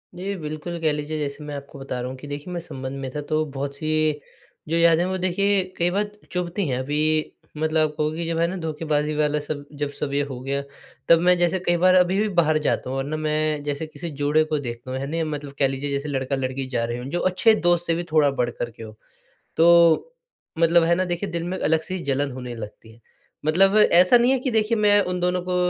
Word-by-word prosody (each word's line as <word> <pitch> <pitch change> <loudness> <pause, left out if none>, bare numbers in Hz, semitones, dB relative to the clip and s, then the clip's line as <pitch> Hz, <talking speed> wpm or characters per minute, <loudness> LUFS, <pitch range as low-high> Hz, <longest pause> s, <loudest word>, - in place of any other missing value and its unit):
जी। 195 +3 -4
बिल्कुल, 155 +3 -5
कह 160 -1 +2
लीजिए 150 +1 -3
जैसे 145 0 -4
मैं 145 -1 -6
आपको 140 0 -9
बता 130 -2 -5
रहा 125 +1 -4
हूँ 130 - -7
कि 145 - -10
देखिए 145 +5 -6
मैं 175 - -3
संबंध 135 -4 -7
में 135 -1 -4
था 150 - -2
तो 155 0 +2
बहुत 140 +1 -4
सी 155 -1 0 0.5
जो 165 - +1
यादें 170 0 +4
वो 190 0 -2
देखिए 190 +2 +2
कई 175 +1 +3
बार 205 +2 -1 0.2
चुभती 180 0 -2
हैं। 125 -2 -1
अभी 145 +3 -2 0.6
मतलब 155 0 +1
कहो 150 0 0
कि 165 +2 -3
जब 165 -1 -1
है 170 - +3
ना 185 - -4
धोखेबाज़ी 155 -2 -1
वाला 150 0 +1
सब 145 -1 -5 0.2
जब 145 - 0
सब 145 -2 -3
ये 145 - +2
हो 125 -2 -6
गया 140 +2 -2 0.5
तब 170 - +7
मैं 180 0 +6
जैसे 175 +2 +1
कई 175 0 +3
बार 185 +1 +4
अभी 185 +2 +3
भी 215 - +1
बाहर 155 -1 +3
जाता - - 0
हूँ 135 - -3
और 135 - -1
ना 155 +3 -4
मैं 155 -1 -1
जैसे 145 +2 -2
किसी 155 +2 -7
जोड़े 150 +2 +3
को 155 -1 -1
देखता 120 -1 -6
हूँ, 130 - -3
है 135 - -4
ना 165 +2 -1
मतलब 145 -1 -7
कह 135 - +4
लीजिए 135 +2 -3
जैसे 140 +1 -2
लड़का-लड़की 135 -1 -2
जा 120 -3 -1
रहे 120 +1 -4
हों, 125 - -7
जो 175 - -2
अच्छे 185 +5 +3
दोस्त 175 -2 +1
से 165 - +3
भी 175 - -2
थोड़ा 150 -3 +4
बढ़ 125 -3 -1
कर 120 0 -5
के 115 - -12
हों। 110 -1 -9 0.6
तो 170 - +5 0.5
मतलब 165 0 +5
है 170 +1 +3
ना 185 +1 0
देखिए 180 +2 -3
दिल 170 0 -3
में 185 +2 -3
अलग 160 +1 +2
से 185 - -6
ही - - -4
जलन 140 0 0
होने 125 -1 -7
लगती 110 0 -10
है 115 - -21 0.5
मतलब 195 +6 +4
ऐसा 180 +2 +6
नहीं 240 +2 +3
है 270 - +3
कि 260 -1 -2
देखिए 220 +1 +1
मैं 205 -1 +4
उन 180 - -2
दोनों 180 0 0
को 180 - 0
155 Hz, 245 wpm, -23 LUFS, 140-175 Hz, 0.6 s, तब